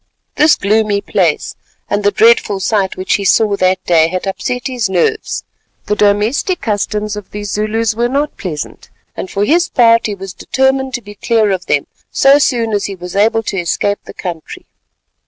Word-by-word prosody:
This 305 0 +5
gloomy 210 0 +1
place, - - 0 0.3
and 205 0 -1
the 205 - +4
dreadful 220 -2 +3
sight 190 0 0
which 185 0 -1
he 200 - -5
saw 205 +2 +3
that 185 0 +1
day, 160 -2 +4
had 185 +3 -4
upset 250 +5 -3
his 245 -6 -1
nerves. 180 -3 -1 0.4
The 210 - 0
domestic 210 - +1
customs 210 0 -2
of 210 -2 -8
these 205 -1 -6
Zulus 215 +1 0
were 235 +2 0
not 285 +3 -1
pleasant, 155 -7 -6 0.3
and 185 - -5
for 200 +1 0
his 345 - +2
part 230 -2 +4
he 210 - -3
was 195 -1 -8
determined 265 0 0
to 245 - -6
be 205 0 -10
clear 215 0 +1
of 185 -1 -3
them 145 - +1 0.3
so 275 +1 +5
soon 230 -5 +1
as 205 - 0
he 200 - -4
was 180 0 -9
able 225 +2 +2
to 195 - -3
escape 200 +4 -1
the - - -11
country. 170 -4 -7
210 Hz, 185 wpm, -15 LUFS, 195-230 Hz, 0.4 s, This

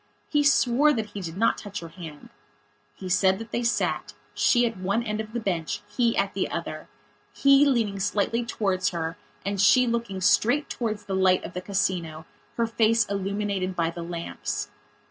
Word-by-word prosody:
He 295 - +3
swore 280 +1 +4
that 220 -4 -3
he 200 - -6
did 170 -1 -6
not 225 - +2
touch 205 -1 -6
her 165 - -8
hand. 160 -3 -10 0.7
He 190 - -8
said 190 +1 +3
that 225 +1 -9
they 235 - -1
sat, 235 -1 -1 0.2
she 240 -1 +3
at 230 - -2
one 195 +5 -1
end 215 -1 -2
of 215 0 -9
the 240 - -2
bench, 175 -7 -2
he 235 -2 +1
at 195 0 +1
the 195 - -1
other; 155 -2 -5 0.4
he 275 +1 +5
leaning 225 -7 +1
slightly 210 +4 0
towards 195 -5 0
her 165 -1 -3 0.3
and 200 -1 -1
she 210 +5 +6
looking 235 -5 -2
straight 240 +9 +2
towards 220 -3 -3
the 195 - -4
light 190 -1 +3
of 170 - -7
the 180 - -4
Casino, 175 -5 -2 0.3
her 235 - +2
face 230 0 +2
illuminated 200 -1 -2
by 165 -1 0
the 170 - -7
lamps. 105 -12 -4
200 Hz, 185 wpm, -26 LUFS, 185-230 Hz, 0.7 s, she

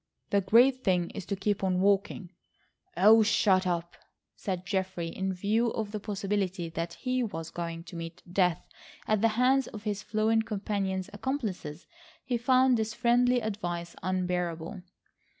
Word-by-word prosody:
The 200 - +3
great 250 +6 +4
thing 180 -2 +1
is 180 - -7
to 200 - -1
keep 200 +1 -1
on 185 -1 +1
walking—" 195 -1 +1 0.7
"Oh, 215 +5 +7
shut 195 -3 +3
up," 170 -1 -2 0.4
said 185 -2 -4
Geoffrey. 185 -3 -2
In 190 +3 -2
view 210 +6 +1
of 215 -2 -3
the 210 - -3
possibility 195 -3 -2
that 165 +1 -4
he 255 -1 -1
was 165 -9 -4
going 170 -1 -5
to 170 0 -11
meet 165 0 -7
death 180 -1 +1 0.4
at 215 -2 +2
the 230 - +5
hands 260 +1 +3
of 210 -1 -9
his 205 -2 -2
fluent 220 +1 +1
companion's 195 -3 -2
accomplices 205 - -4 0.4
he 250 - -1
found 255 +1 +4
this 220 -1 -2
friendly 245 +1 +3
advice 175 -6 -4
unbearable. 180 0 -2
195 Hz, 150 wpm, -29 LUFS, 180-220 Hz, 0.7 s, Oh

